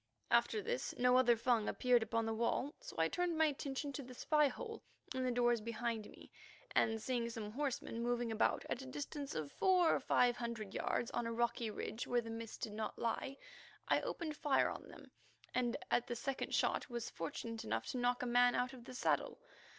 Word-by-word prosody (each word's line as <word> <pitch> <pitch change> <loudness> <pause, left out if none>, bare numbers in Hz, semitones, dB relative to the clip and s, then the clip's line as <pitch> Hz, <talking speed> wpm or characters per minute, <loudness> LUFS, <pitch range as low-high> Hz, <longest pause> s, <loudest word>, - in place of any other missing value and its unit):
After 430 - +3
this 485 +2 -2
no 250 0 +5
other 245 -2 +5
Fung 230 -2 +2
appeared 250 -1 +3
upon 225 +1 0
the 225 - 0
wall, 235 +5 0
so - - -10
I - - +4
turned 355 -2 0
my 320 - +5
attention 280 -1 -2
to 280 - -4
the 255 -1 -10
spy 300 +3 +3
hole 450 - -6 0.3
in 260 0 -1
the 255 - +1
doors 240 -1 +3
behind 230 -1 -3
me, - - -14 0.4
and 225 0 +2
seeing 235 +1 -1
some 220 -2 -5
horsemen 255 -3 -2
moving 240 -1 0
about 220 - +1
at 245 - -2
a 265 - -8
distance 285 +1 -5
of 150 -2 -3
four 365 -3 +4
or - - +2
five 245 -1 +3
hundred 230 -4 -4
yards 235 - -1
on 240 - -1
a - - -2
rocky 235 0 0
ridge 220 +2 -4
where 245 -1 +2
the 225 -1 -7
mist 225 -1 -6
did 215 - -3
not 215 0 -3
lie, 265 +4 -2 0.5
I - - +3
opened 315 -3 -3
fire 290 -2 +2
on - - -7
them - - -13 0.4
and 245 -2 +1
at 245 - +2
the 240 - -2
second 270 +3 -2
shot - - +1
was 235 -1 -4
fortunate 225 +7 -4
enough 110 +1 -1
to 255 - -2
knock 245 0 +1
a - - 0
man 245 0 +5
out 250 +2 0
of 245 -2 -11
the 255 - -9
saddle. - - +1
245 Hz, 210 wpm, -37 LUFS, 230-270 Hz, 0.5 s, no